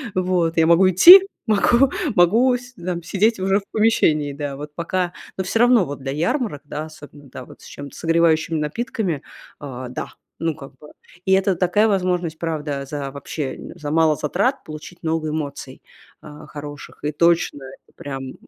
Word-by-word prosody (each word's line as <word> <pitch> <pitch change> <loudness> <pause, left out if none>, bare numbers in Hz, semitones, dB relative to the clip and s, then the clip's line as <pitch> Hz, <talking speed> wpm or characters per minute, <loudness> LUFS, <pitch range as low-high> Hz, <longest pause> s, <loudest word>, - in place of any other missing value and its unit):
Вот 180 -3 0
я 165 - +5
могу 170 +3 +5
идти, 360 - +9 0.2
могу 235 +5 +3 0.2
могу 225 +9 +4
с 245 +1 -14
да, 175 0 -4
сидеть 210 +5 +1
уже 195 +1 +2
в - - -15
помещении, 155 -10 +2
да. 145 -1 -5
Вот 150 +1 -9
пока, 180 +1 -2 0.2
но 190 - -1
всё 195 +4 -1
равно 240 -3 +5
вот 145 -2 -7
для 135 0 -5
ярмарок, 170 - -2
да, 150 +1 -5
особенно, 145 -2 -14
да, 130 - -9
вот - - -16
с - - -15
чем-то 140 -1 -10
согревающими 165 -1 +1
напитками, 170 - -3 0.4
а, 130 -3 -7
да. 125 - -6 0.2
Ну, 165 -1 -1
как 140 -2 -12
бы, 150 - -14 0.4
и 190 - 0
это 190 0 +2
такая 185 +5 +2
возможность, 180 -5 -1
правда, 150 -4 -4
за 140 0 -5
вообще, 140 0 -5
э, - - -10
за 150 - -6
мало 160 -1 +3
затрат 200 - -1
получить 155 +3 -10
много 160 -1 -1
эмоций, 145 -3 -6 0.4
а, 150 0 -12
хороших, 145 0 -10
и 150 - -1
точно, 165 -2 +1
это 135 0 -14
прям, 135 -2 -6
м, 130 - -8
165 Hz, 180 wpm, -21 LUFS, 145-190 Hz, 0.4 s, идти